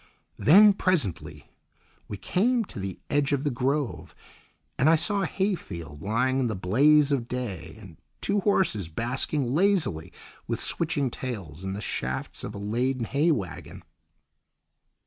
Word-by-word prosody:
Then, 205 +7 +7
presently, 170 - -1 0.6
we 105 - -6
came 220 - +1
to 120 - -9
the 95 -2 -5
edge 145 0 +1
of 140 -1 0
the 145 - 0
grove, 135 +2 -2 0.6
and 140 - +5
I 165 - +6
saw 200 +5 0
a 180 - 0
hayfield 85 - -4
lying 125 +7 0
in 130 - +1
the 110 - -2
blaze 140 +11 +4
of 125 -4 0
day, 115 -8 -5
and 95 -6 -13 0.2
two 205 0 0
horses 185 - +1
basking 125 - -2
lazily 160 - +1 0.4
with - - -2
switching 145 -6 0
tails 95 - -6
in 95 0 -3
the 100 - -5
shafts 65 -7 -4
of 105 - -6
a - - -5
laden 120 +5 -1
hay 145 +8 +1
waggon. 100 - -3
130 Hz, 145 wpm, -26 LUFS, 100-155 Hz, 0.6 s, Then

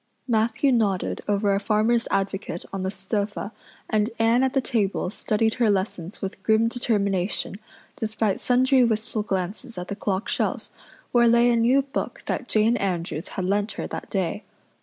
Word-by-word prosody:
Matthew 230 +3 +2
nodded 205 -6 +1
over 205 0 +2
a 195 - +2
Farmers' 220 +3 +2
Advocate 195 -3 -2
on 195 - -2
the 190 - -1
sofa 200 +2 -3 0.4
and 215 0 +1
Anne 230 +2 +3
at 265 0 +1
the 270 - +3
table 210 -7 0
studied 220 +1 0
her 230 - +5
lessons 190 -2 -2
with 195 0 -5
grim 220 +2 +3
determination, 200 -6 0 0.4
despite 220 -2 -1
sundry 255 +1 +4
wistful 220 -1 0
glances 195 +1 -3
at 180 0 -5
the 200 - -3
clock 200 -1 -2
shelf, - - -1 0.4
where 240 -1 +5
lay 235 +1 +5
a - - +3
new 245 +4 +4
book 270 - -4
that 250 - -2
Jane 225 +3 +3
Andrews 175 -4 -2
had 185 - -1
lent 205 +3 0
her - - -4
that - - -6
day. 195 +1 -2
215 Hz, 165 wpm, -24 LUFS, 195-235 Hz, 0.4 s, her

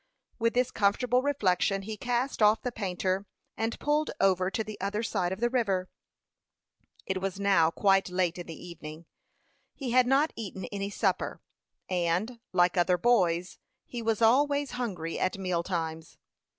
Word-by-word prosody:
With 230 +1 +1
this 250 0 +2
comfortable 240 +5 +2
reflection 195 -7 +1
he 215 +2 -5
cast 245 +2 -2
off 215 +1 +5
the 250 - -2
painter, 190 -2 -2 0.3
and 225 +1 -2
pulled 300 +1 +1
over 185 -1 +3
to 220 - -2
the 215 -2 -8
other 205 +3 -1
side 185 -6 -1
of 190 - -4
the 240 +1 +2
river. 195 -8 0 1.1
It 190 -1 -2
was 195 0 -3
now 195 -5 +4
quite 195 +2 +2
late 180 -1 0
in 175 - -7
the 165 +1 -9
evening. 160 -1 -9 0.7
He 265 -4 -4
had 250 0 +5
not 280 +4 +3
eaten 190 -4 -6
any 200 -1 -3
supper, - - -1 0.5
and, 185 +6 -1
like 180 0 +3
other 180 +1 +3
boys, 180 -5 +2 0.3
he 240 - -6
was 225 0 0
always 285 +4 +3
hungry 195 -10 -3
at 185 - 0
meal 185 -3 -1
times. 165 -3 -4
195 Hz, 160 wpm, -29 LUFS, 180-235 Hz, 1.1 s, off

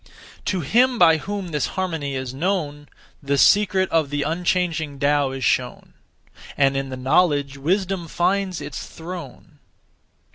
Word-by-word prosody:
To 185 -2 -1
him 245 - +3
by 165 -4 +6
whom 200 +2 -5
this 150 -3 -1
harmony 165 -7 -2
is 130 -1 -4
known, 145 -2 -2 0.3
(The 140 0 0
secret 195 +3 +4
of) 160 -4 +2
the 145 0 -1
unchanging 165 -2 -1
(Tao) 145 0 +2
is 135 -1 -4
shown, 125 -1 -1 0.6
And 135 -1 +3
in 135 0 -2
the 130 - -6
knowledge 140 +1 +2
wisdom 185 +3 -1
finds 185 +1 0
its 145 0 -6
throne. 165 -5 -10
160 Hz, 140 wpm, -22 LUFS, 140-185 Hz, 0.6 s, by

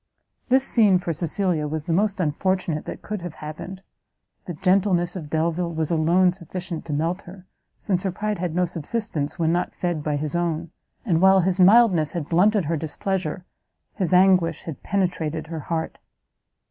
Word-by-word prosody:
This 265 +1 +3
scene 210 -5 +4
for 175 -2 -3
Cecilia, 170 -1 0
was 155 0 -3
the 165 - -2
most 200 +2 +1
unfortunate 175 0 -1
that - - -7
could 210 -3 -5
have 175 -2 -7
happened; 175 +5 -8 0.6
the 175 - -6
gentleness 185 0 +2
of 160 -5 -6
Delvile 170 +2 -1
was 160 0 -2
alone 170 +3 +3
sufficient 175 -1 -6
to 150 - -4
melt 165 +6 -1
her, 185 +1 -12 0.3
since 185 -3 -1
her 190 - -1
pride 210 +2 -3
had 175 -2 -3
no 180 0 +2
subsistence 165 -2 -3
when 165 -1 +1
not 175 +1 -1
fed 175 -4 -2
by 150 -1 -1
his 150 +2 -3
own; 170 -1 -2 0.3
and 170 -6 +1
while 190 0 +6
his 185 +1 0
mildness 185 -5 +5
had 170 -5 -4
blunted 195 +2 +3
her 165 +2 -1
displeasure, 180 +2 -3 0.5
his 185 -5 -1
anguish 180 -3 +4
had 160 -4 -7
penetrated 170 -5 -1
her 160 0 -6
heart. 160 +1 -4
175 Hz, 170 wpm, -23 LUFS, 160-190 Hz, 0.6 s, while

